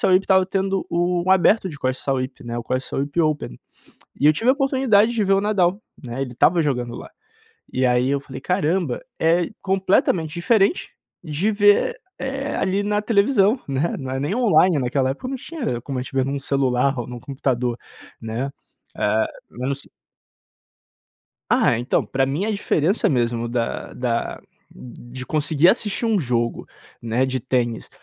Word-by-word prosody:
Sauípe, 185 +1 +4
estava 190 -1 +4
tendo 195 0 -1
o 175 0 0
aberto 190 +2 +4
de 150 -4 -9
Costa 130 -1 -2
do - - -13
Sauípe, 130 -1 -2
o 120 0 -4
Costa 130 +2 -2
do - - -15
Sauípe 145 +4 -1
Open. 150 - -1 0.6
E - - +2
eu 155 - +7
tive 230 +10 0
a - - +7
oportunidade 260 -6 +3
de 220 -3 +1
ver 195 0 +3
o 195 - +3
Nadal, 200 -1 +1 0.2
né, 125 +2 -5
ele 125 -2 -4
estava 165 +7 +3
jogando 125 -5 -2
lá. - - -9 0.6
E 130 +1 0
aí 125 +1 +2
eu 140 -1 +1
falei 130 -1 -9
caramba, 175 -4 0 0.2
é 170 +1 +2
completamente 185 -4 +1
diferente 195 - +2 0.3
de 170 +5 -1
ver, 205 - +3 0.2
eh, 270 +1 -3
ali 195 +2 0
na 210 0 +1
televisão, 215 +1 +3
né, 140 +5 -1
não 130 -2 -6
é 135 - -2
nem 150 +9 -1
online 195 -8 +4
naquela 130 0 0
época 145 - -5
não 270 - -3
tinha 250 - -4
como 135 -3 -4
a - - -2
gente 130 - -9
vê 130 -1 +2
num 140 0 -3
celular 135 -1 +1
ou 120 - -3
num 120 -1 -8
computador, 125 -3 -2 0.4
né? 115 +5 -3 0.5
Eh, 110 +1 +2 0.3
não 125 +3 -3
se 140 - -10 1.6
Ah, 120 - +3
então, 120 +2 0
pra 135 0 0
mim 145 +9 -1
a 220 - -1
diferença 200 -2 +1
mesmo 120 -3 0
da 120 -1 -3
da 120 -2 -2 0.3
de 125 +1 -10
conseguir 155 +3 +2
assistir 220 +1 +1
um 220 -3 +2
jogo, 120 -5 -1 0.3
né, 115 +3 0
de 130 0 -1
tênis 120 -2 -1
150 Hz, 175 wpm, -22 LUFS, 130-195 Hz, 1.6 s, eu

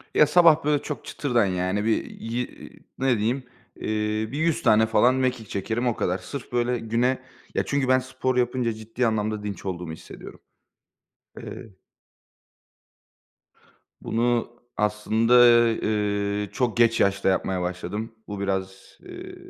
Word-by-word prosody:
Ya, 150 - +6
sabah, 165 0 +5
böyle, 150 -1 +2
çok 150 - -6
çıtırdan 120 -6 0
yani, 95 +2 -1
bir 115 - +1
ye 120 +2 -3 0.5
ne 130 -3 +2
diyeyim, 120 +6 -1 0.3
eee, - - -12 0.5
bir 140 - -4
100 160 0 0
tane 110 +1 +5
falan 120 +3 +4
mekik 125 -4 -1
çekerim, 110 +5 -2
o 120 - +1
kadar. 90 +1 -1
Sırf 125 +8 -8
böyle 120 0 0
güne 120 +3 0 0.4
Ya, - - +1
çünkü 140 -2 0
ben 130 0 +4
spor 130 0 -2
yapınca 120 -1 +1
ciddi 115 +3 -2
anlamda 110 -1 -1
dinç 100 -1 -6
olduğumu 90 -3 -4
hissediyorum. 80 - -11 1.0
Eee 100 -4 -10 2.3
Bunu 120 0 0 0.3
aslında, 110 +3 +4 0.2
eee, 105 -2 -1
çok 120 +1 -1
geç 115 -1 +4
yaşta 100 0 +2
yapmaya 95 0 0
başladım. 90 +5 -4
Bu 105 -1 -6
biraz, 95 -1 -4
eee, 365 0 -9
115 Hz, 135 wpm, -25 LUFS, 105-125 Hz, 2.3 s, Ya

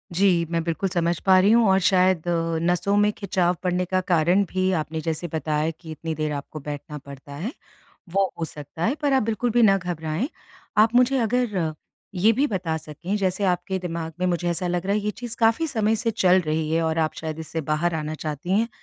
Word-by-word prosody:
जी। 195 +3 +4 0.2
मैं 165 -1 0
बिल्कुल 170 +3 -1
समझ 170 -2 0
पा 190 -1 +6
रही 195 +3 +4
हूँ 230 -1 +5
और 190 0 +4
शायद 185 -2 +3
अ, - - +2 0.3
नसों 180 +3 +1
में 210 - +3
खिंचाव 180 -3 +1
पड़ने 180 0 0
का 185 +1 0
कारण 175 +4 +4
भी 185 0 +1
आपने 160 +1 -4
जैसे 165 +1 -3
बताया 155 0 0
कि 160 0 -12
इतनी 160 +1 -4
देर 155 0 -2
आपको 145 +2 -6
बैठना 150 +1 -6
पड़ता 140 0 -11
है 230 - -2 0.6
वो 195 -1 +2
हो 165 - -1
सकता 150 +1 -7
है। 240 - +2
पर 285 -1 +2
आप 265 - +4
बिल्कुल 225 +2 -1
भी 240 +1 +3
ना 195 -3 +6
घबराएँ। 175 - -3 0.5
आप 220 +2 +5
मुझे 250 +2 +4
अगर 240 -2 0
अ, 160 -3 0 0.4
ये 200 +5 +4
भी 270 +6 +2
बता 180 - -2
सकें 160 +5 -4
जैसे 190 0 0
आपके 190 +1 0
दिमाग़ 165 -2 -4
में 185 - +2
मुझे 175 -1 0
ऐसा 175 +2 -2
लग 175 +1 -1
रहा 200 - +1
है 210 - +1
ये 210 +1 -1
चीज़ 235 +2 -7
काफ़ी 230 +8 +3
समय 225 -6 +1
से 230 +1 0
चल 190 -4 +4
रही 155 0 -1
है 165 +1 +2
और 160 0 0
आप 155 -1 0
शायद 160 -1 -5
इससे 160 0 -4
बाहर 170 +3 +1
आना 155 -1 -3
चाहती 155 +2 -5
हैं, 230 +1 +1
180 Hz, 225 wpm, -24 LUFS, 160-205 Hz, 0.6 s, पा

